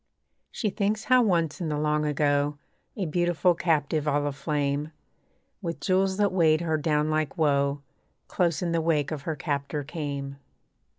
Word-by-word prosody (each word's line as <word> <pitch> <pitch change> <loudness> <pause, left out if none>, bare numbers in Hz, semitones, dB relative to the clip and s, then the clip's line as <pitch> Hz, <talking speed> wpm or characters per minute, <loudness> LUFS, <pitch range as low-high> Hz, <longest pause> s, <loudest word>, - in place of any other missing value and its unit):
She 215 -4 -2
thinks 215 +2 -1
how 255 0 +5
once 175 -6 +1
in 165 - -2
the 150 - -1
Long 150 0 +1
Ago, 145 0 +1 0.4
A 195 - -1
beautiful 175 +2 +2
captive, 155 -3 0
all 145 0 +1
aflame 145 +1 -1 0.7
With 170 -3 -4
jewels 190 0 +1
that 205 -1 +2
weighed 165 -3 +3
her 160 -2 0
down 150 0 +1
like 155 -3 -1
woe, 140 -2 +1 0.4
Close 170 -4 0
in 170 - -1
the 165 -1 +1
wake 155 -3 +1
of 155 -3 -4
her 160 - -1
captor 145 +1 -3
came. 140 -2 -5
155 Hz, 160 wpm, -26 LUFS, 145-175 Hz, 0.7 s, how